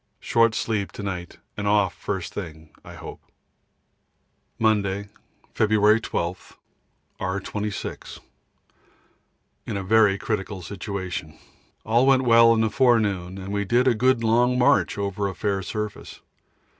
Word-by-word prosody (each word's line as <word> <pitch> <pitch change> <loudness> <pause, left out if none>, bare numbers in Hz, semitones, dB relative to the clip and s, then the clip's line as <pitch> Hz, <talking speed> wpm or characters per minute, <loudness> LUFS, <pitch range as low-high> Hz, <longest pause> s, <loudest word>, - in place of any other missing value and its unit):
Short 115 -1 +2
sleep 105 -3 -2
to 105 - -7
night 90 -3 -5 0.2
and 105 0 -3
off 100 -2 +2
first 95 -4 -5
thing, 80 -5 -8
I - - -11
hope. - - -10 1.4
Monday, 100 -2 0 0.4
February 110 0 +3
12. 90 -4 -4 0.6
R. 95 +1 -2
26. 105 +1 -5 1.5
In - - -3
a 95 - -4
very 105 0 +4
critical 95 -2 -4
situation. 95 -3 -6 0.5
All 120 +4 +3
went 135 -1 +4
well 115 -1 +6
in 110 - +1
the 110 -1 +1
forenoon, 105 -9 +1
and 95 +1 -6
we 100 0 0
did 120 +5 +2
a 125 - +5
good 125 +1 +2
long 120 +3 +3
march 125 -3 +3
over 100 0 -2
a 95 - -5
fair 100 -2 -1
surface. 105 +2 -6
105 Hz, 130 wpm, -24 LUFS, 95-115 Hz, 1.5 s, well